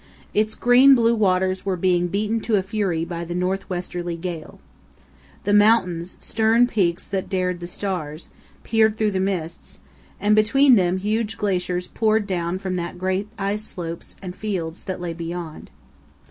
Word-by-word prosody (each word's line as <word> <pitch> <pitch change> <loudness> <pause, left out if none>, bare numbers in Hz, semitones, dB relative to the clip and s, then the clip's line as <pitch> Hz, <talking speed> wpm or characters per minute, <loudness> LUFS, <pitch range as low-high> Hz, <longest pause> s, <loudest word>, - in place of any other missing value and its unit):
Its 215 +1 +1
green 255 +3 +6
blue 230 -1 +3
waters 185 -3 +1
were 190 -2 -1
being 175 0 +2
beaten 210 +5 -1
to 215 -3 +1
fury 190 -5 -1
by 170 0 -5
the 175 +1 -5
north 185 +2 -2
westerly 175 -1 -4
gale. 170 -2 -6 0.8
The 205 - +1
mountains, 190 -5 +3
"stern 225 +2 +3
peaks 185 -8 0
that 190 -2 -3
dared 180 -2 -1
the 175 - -6
stars," 175 -5 -5 0.3
peered 220 -1 +2
through 215 -1 +1
the 190 - -1
mists, 180 -4 -3 0.4
and 210 +1 +3
between 255 +6 +5
them 185 -4 +3
huge 215 +3 -1
glaciers 180 -3 -1
poured 220 0 +1
down 175 -2 -2
from 185 -1 -3
the 175 0 -4
great 190 +3 -1
ice 200 +1 -2
slopes 170 -5 -7
and 180 -1 -6
fields 180 -6 -4
that 185 -2 -4
lay 175 -1 -4
behind. 165 -1 -6
185 Hz, 160 wpm, -22 LUFS, 175-215 Hz, 0.8 s, green